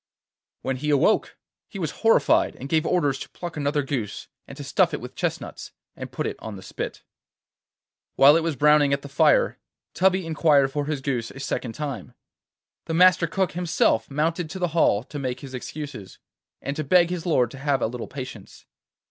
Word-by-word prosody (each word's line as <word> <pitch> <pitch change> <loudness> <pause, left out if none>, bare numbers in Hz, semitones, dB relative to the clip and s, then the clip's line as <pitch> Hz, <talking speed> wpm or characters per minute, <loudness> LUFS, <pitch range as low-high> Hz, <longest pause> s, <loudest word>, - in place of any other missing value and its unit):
When 130 0 -1
he 150 +3 -3
awoke 145 -2 +2 0.3
he - - -9
was - - -2
horrified, - - +3
and 135 - -8
gave 160 +2 +1
orders 145 -7 +1
to - - -8
pluck 175 -2 -7
another 145 0 0
goose, 125 -7 -4 0.2
to - - -9
stuff - - +2
it - - -5
with - - -9
chestnuts, - - -4 0.2
and - - -8
put - - -3
it - - -3
on 110 -2 -7
the 95 - -10
spit. - - -6 1.1
While 140 +2 +7
it 165 - +3
was 160 -2 -1
browning 150 +1 +4
at 140 - -1
the - - -7
fire, 485 - +3 0.3
Tubby 190 -1 +2
inquired 150 -4 +3
for 145 +1 -2
his 150 -3 -2
goose 125 -4 -2
a 135 - -11
second 130 -4 -3
time. 140 -4 -6 0.7
The 165 - -2
Master 180 0 +5
Cook 185 +2 0
himself 170 -9 +1
mounted 160 +3 -1
to 190 - -6
the 180 -2 -1
hall 150 -10 +2
to 145 +3 -8
make 130 -2 -3
his 135 -2 -9
excuses, 130 -5 -7 0.5
and 140 - -3
to 155 - -1
beg 175 +4 +4
his 180 -1 -4
lord 125 -8 +2
to 135 - -10
have 140 -2 0
a - - +3
little 120 +1 -5
patience. 130 -7 -9
145 Hz, 190 wpm, -24 LUFS, 135-165 Hz, 1.1 s, While